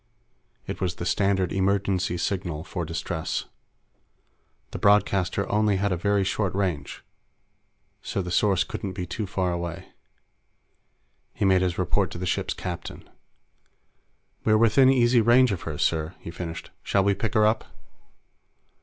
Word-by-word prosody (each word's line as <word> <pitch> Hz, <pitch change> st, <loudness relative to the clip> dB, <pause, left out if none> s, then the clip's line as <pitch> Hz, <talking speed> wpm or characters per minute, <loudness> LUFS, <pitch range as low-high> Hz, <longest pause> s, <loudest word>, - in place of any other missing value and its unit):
It -, -, -6 dB
was 90 Hz, -2 st, -1 dB
the 85 Hz, -, -5 dB
standard 95 Hz, -1 st, +1 dB
emergency 95 Hz, -2 st, 0 dB
signal 85 Hz, -4 st, -2 dB
for 85 Hz, -1 st, -4 dB
distress. 80 Hz, 0 st, -3 dB, 1.3 s
The -, -, -5 dB
broadcaster 100 Hz, -1 st, +2 dB
only 105 Hz, -1 st, +2 dB
had 100 Hz, +1 st, 0 dB
a -, -, +2 dB
very 100 Hz, +3 st, +1 dB
short 95 Hz, 0 st, -1 dB
range, 90 Hz, -8 st, -2 dB, 1.0 s
so 95 Hz, -, -3 dB
the 90 Hz, -, -5 dB
source 95 Hz, 0 st, +3 dB
couldn't 95 Hz, -2 st, -5 dB
be 90 Hz, -, -4 dB
too 100 Hz, +4 st, -4 dB
far 95 Hz, -1 st, -1 dB
away. 85 Hz, -1 st, -5 dB, 1.5 s
He -, -, 0 dB
made 95 Hz, -1 st, +4 dB
his 90 Hz, -1 st, 0 dB
report 90 Hz, +1 st, +1 dB
to -, -, -8 dB
the 90 Hz, -, -4 dB
ship's -, -, -1 dB
captain. 90 Hz, -2 st, -6 dB, 1.4 s
"We're 110 Hz, -1 st, +4 dB
within 115 Hz, +4 st, +5 dB
easy 120 Hz, -2 st, +4 dB
range 120 Hz, +2 st, +5 dB
of 95 Hz, -, -3 dB
her, 75 Hz, -, -5 dB
sir," 80 Hz, +3 st, 0 dB
he 85 Hz, -, -8 dB
finished. 85 Hz, -1 st, -7 dB
"Shall 100 Hz, -, +1 dB
we 100 Hz, +1 st, +3 dB
pick 110 Hz, +3 st, -3 dB
her 105 Hz, -1 st, +5 dB
up?" 110 Hz, +1 st, +1 dB
95 Hz, 145 wpm, -25 LUFS, 85-105 Hz, 1.5 s, within